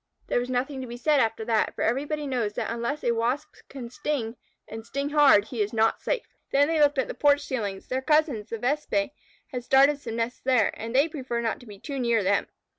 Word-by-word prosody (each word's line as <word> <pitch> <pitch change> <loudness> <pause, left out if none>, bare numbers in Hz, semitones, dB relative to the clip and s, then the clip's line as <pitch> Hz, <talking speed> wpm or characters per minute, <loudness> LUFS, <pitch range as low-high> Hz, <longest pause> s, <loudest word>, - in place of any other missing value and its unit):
There - - +1
was 245 +1 -4
nothing 260 +2 -2
to 255 - -6
be 240 0 -7
said 295 +3 +3
after 225 -2 0
that, 225 -2 +1
for - - -2
everybody 290 +5 -1
knows 240 -6 -1
that - - -3
unless 235 +6 -3
a 240 - +2
Wasp 245 +7 -1 0.2
can 245 -4 -8
sting, 260 -5 -3 0.3
and 225 0 -8
sting 280 +5 -3
hard, 285 -9 +6
he 235 -4 -3
is 210 +2 -1
not 225 0 +2
safe. - - -1 0.3
Then 285 +1 +4
they 325 0 +1
looked 290 -1 +4
at 265 - +1
the - - -5
porch 290 0 +3
ceilings. 210 -9 -4
Their 260 +1 -1
cousins, 295 -7 +1
the 230 - -3
Vespæ, 295 +4 0 0.4
had 250 -3 -4
started 275 +3 +4
some 230 -5 -6
nests 235 +1 -3
there, 250 -5 +3
and 230 +2 -6
they 280 +4 +5
preferred 260 -6 -4
not 225 - -1
to 245 - -15
be 205 -1 -10
too 275 +6 -6
near 235 -3 +2
them. 200 +1 +1
255 Hz, 230 wpm, -26 LUFS, 230-285 Hz, 0.4 s, hard